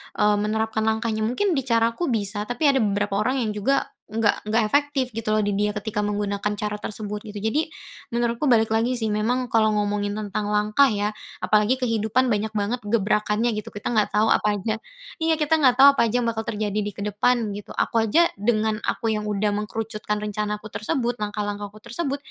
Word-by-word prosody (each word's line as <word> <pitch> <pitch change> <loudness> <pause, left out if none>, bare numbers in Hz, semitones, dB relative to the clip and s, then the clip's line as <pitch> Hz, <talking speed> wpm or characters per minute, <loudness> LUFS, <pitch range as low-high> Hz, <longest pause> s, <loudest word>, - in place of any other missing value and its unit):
eee, 210 0 +3
menerapkan 220 +1 -1
langkahnya. 220 0 0
Mungkin 375 - 0
di 275 -5 0
caraku 230 +7 +1
bisa, 210 -3 -1
tapi 245 +5 -4
ada 270 - +1
beberapa 205 -2 0
orang 255 +5 +1
yang 215 - -1
juga 210 +7 0 0.2
nggak 215 -1 0
nggak 225 +1 +3
efektif, 285 +2 +1
gitu 225 0 -4
loh, 215 - +3
di 205 - 0
dia 210 +1 +1
ketika 210 0 -3
menggunakan 205 0 -1
cara 210 0 -3
tersebut, 210 0 -5
gitu. 210 - -7
Jadi 245 +10 0 0.4
menurutku 235 +3 0
balik 225 -2 +3
lagi 235 +3 +1
sih, 225 - -1
memang 245 +4 0
kalau 220 -1 +4
ngomongin 205 0 -1
tentang 205 0 -3
langkah 210 +6 +3
ya, 210 -1 -1 0.3
apalagi 215 +4 +3
kehidupan, 230 0 +1
banyak 220 -3 0
banget 215 +5 -1
gebrakannya, 210 +2 +1
gitu. 210 -1 -5
Kita 205 +3 -4
nggak 215 -2 +2
tahu 215 +1 +3
apa 210 -1 +1
aja 215 +3 -2 0.5
iya, 320 0 +2
kita 310 +1 +2
nggak 255 -3 +5
tahu 270 +1 +9
apa - - +1
aja 245 +3 +1
yang - - 0
bakal 225 -1 -2
terjadi 215 -2 -2
di 205 - -2
kedepan, 210 +2 0
gitu. 205 0 -8
Aku 230 - +2
aja 225 +11 +4
dengan 215 +1 0
aku 225 -1 -1
yang 210 0 -3
udah 205 0 0
mengerucutkan 210 +1 -3
rencanaku 210 0 -4
tersebut, 240 +3 -1
langkah-langkahku 205 0 -4
tersebut, 275 +6 -3
215 Hz, 190 wpm, -24 LUFS, 210-235 Hz, 0.5 s, tahu